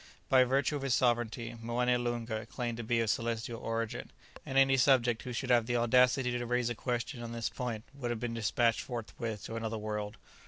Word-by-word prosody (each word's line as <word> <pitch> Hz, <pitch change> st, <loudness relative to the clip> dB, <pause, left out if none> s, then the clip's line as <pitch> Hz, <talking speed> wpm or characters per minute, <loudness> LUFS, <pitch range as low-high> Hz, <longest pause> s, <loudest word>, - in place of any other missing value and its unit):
By 130 Hz, -1 st, +7 dB
virtue 135 Hz, +3 st, +1 dB
of -, -, -6 dB
his 135 Hz, -3 st, +2 dB
sovereignty 120 Hz, -1 st, 0 dB
Moené 125 Hz, +1 st, +1 dB
Loonga 115 Hz, -2 st, -3 dB
claimed 120 Hz, -3 st, -3 dB
to 120 Hz, -, -4 dB
be 115 Hz, +1 st, +1 dB
of 115 Hz, -, 0 dB
celestial 115 Hz, +1 st, -2 dB
origin; 115 Hz, -1 st, -3 dB, 0.3 s
and 135 Hz, -, -3 dB
any 135 Hz, 0 st, +6 dB
subject 125 Hz, -3 st, +4 dB
who 125 Hz, -, -6 dB
should 125 Hz, +2 st, -2 dB
have 120 Hz, -2 st, +4 dB
the 120 Hz, -, 0 dB
audacity 125 Hz, +2 st, +4 dB
to 120 Hz, 0 st, -2 dB
raise 125 Hz, 0 st, +1 dB
a -, -, 0 dB
question 120 Hz, +2 st, -3 dB
on 115 Hz, 0 st, -6 dB
this 115 Hz, -1 st, -2 dB
point 115 Hz, -4 st, -4 dB
would 135 Hz, -4 st, -4 dB
have 120 Hz, -2 st, -2 dB
been 120 Hz, 0 st, -3 dB
despatched 115 Hz, 0 st, +1 dB
forthwith 115 Hz, -3 st, -5 dB
to 115 Hz, -, -5 dB
another 115 Hz, 0 st, -3 dB
world. 105 Hz, 0 st, -4 dB
120 Hz, 205 wpm, -32 LUFS, 115-125 Hz, 0.3 s, By